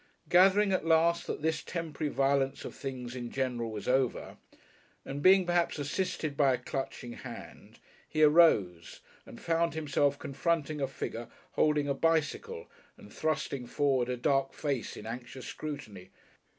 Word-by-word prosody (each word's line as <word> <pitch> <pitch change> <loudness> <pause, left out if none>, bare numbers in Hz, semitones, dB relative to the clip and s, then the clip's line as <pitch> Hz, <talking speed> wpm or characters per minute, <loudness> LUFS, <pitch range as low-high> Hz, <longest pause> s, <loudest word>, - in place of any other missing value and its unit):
Gathering 195 +3 +5
at 185 - +1
last 165 +1 +3
that - - -4
this 160 -1 0
temporary 160 -3 -4
violence 135 0 +1
of - - -6
things 130 -3 -6
in 120 -1 -5
general 125 -3 -2
was 105 -2 -6
over, 130 0 0 0.7
and 140 +1 -5
being 190 +2 +6
perhaps 175 -1 +1
assisted 155 0 -2
by 140 -2 +4
a - - -5
clutching 125 -1 -5
hand, - - -10 0.3
he 155 0 +2
arose, 110 - +4 0.3
and - - -11
found 165 0 0
himself 145 -2 +1
confronting 150 +1 -1
a 135 - +1
figure 120 -3 -5 0.2
holding 150 -2 +2
a 140 - +1
bicycle 165 - 0 0.3
and - - -14
thrusting 140 -5 -2
forward 130 -2 +1
a 125 - -1
dark 135 +2 +1
face 140 -7 -3
in 105 - -9
anxious 125 +3 -7
scrutiny. 110 -11 -7
145 Hz, 150 wpm, -30 LUFS, 125-160 Hz, 0.7 s, being